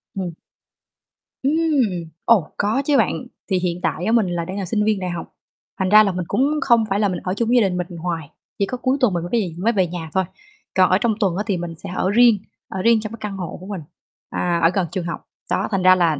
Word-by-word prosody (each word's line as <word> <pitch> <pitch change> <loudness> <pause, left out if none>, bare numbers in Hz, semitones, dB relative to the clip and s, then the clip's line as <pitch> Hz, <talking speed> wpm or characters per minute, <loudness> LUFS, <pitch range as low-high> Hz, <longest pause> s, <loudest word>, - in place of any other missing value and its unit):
Ừm. 185 -3 -3 1.1
Ừm! 275 - +2 0.7
Ồ, 205 -9 +4
có 215 +6 +1
chứ 290 -1 +3
bạn. 250 +2 +1 0.2
Thì 190 -2 +2
hiện 180 -1 -2
tại 175 - -1
á, 220 - +1
mình 230 -4 +3
là 175 -1 -2
đang 185 +3 -5
là 195 - -2
sinh 210 +4 0
viên 215 -1 +1
đại 185 -1 -3
học, 175 -1 -5 0.5
thành 190 -1 +1
ra 215 +2 +8
là 200 - +1
mình 180 -1 -3
cũng 275 +3 +2
không 235 -2 +4
phải 195 +1 +1
là 205 -2 +2
mình 180 - -3
ở 185 - -1
chung 225 +3 0
với 250 - +4
gia - - +6
đình 180 - -3
mình 180 -1 -4
hoài, 165 -3 -4 0.3
chỉ 200 - +3
có 250 - -4
cuối 260 +2 +1
tuần 250 -7 +3
mình 170 -1 -1
mới 175 - -5
về 180 -4 -3
mới 220 +6 +1
về 190 -4 +2
nhà 165 -2 -6
thôi. 190 - +2 0.5
Còn 185 -1 +5
ở 185 - +5
trong 225 +2 +1
tuần 195 -6 +1
á 205 - 0
thì 195 -4 +1
mình 170 -1 -5
sẽ - - -8
ở 185 - +1
riêng, 235 0 +6 0.3
ở 190 - -3
riêng 230 +2 +4
trong 215 -1 -5
cái - - -7
căn 200 -2 -4
hộ 180 -3 -5
của 185 - -11
mình, 200 -4 -5 0.5
à, 175 -1 0
ở 165 - +7
gần 185 -3 0
trường 185 -3 -3
học. 170 - -5 0.3
Đó, - - +1
thành 195 -2 0
ra 185 0 +7
là 165 -5 +2
190 Hz, 265 wpm, -21 LUFS, 175-215 Hz, 1.1 s, ra